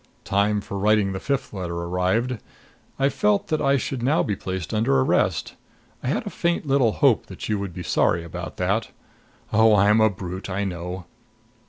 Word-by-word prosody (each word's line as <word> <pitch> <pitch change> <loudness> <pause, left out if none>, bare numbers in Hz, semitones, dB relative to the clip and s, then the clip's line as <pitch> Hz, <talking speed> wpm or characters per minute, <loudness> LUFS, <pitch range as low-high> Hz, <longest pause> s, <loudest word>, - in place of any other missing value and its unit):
Time 100 +1 +1
for 100 0 -6
writing 105 -1 +3
the 95 - -4
fifth 140 0 -2
letter 90 -3 -4
arrived. 90 +8 0 0.6
I 135 - +3
felt 105 -7 +1
that 155 - 0
I 140 -1 +3
should 130 -1 -3
now 140 +7 +2
be 105 - -1
placed 95 -2 -5
under 110 - +2
arrest. 65 - +1 0.5
I - - -5
had - - -1
a - - -5
faint 170 -1 -1
little 135 -6 +3
hope - - +3
that - - -7
you 105 -2 0
would 100 -2 -4
be 90 +1 -7
sorry 85 -1 +1
about 85 - -7
that. - - 0 0.6
Oh, 110 0 +6
I'm 105 +2 +4
a 110 - +5
brute, 95 -1 -6
I 100 +2 -1
know! 90 -1 -5
100 Hz, 185 wpm, -24 LUFS, 90-115 Hz, 0.6 s, Oh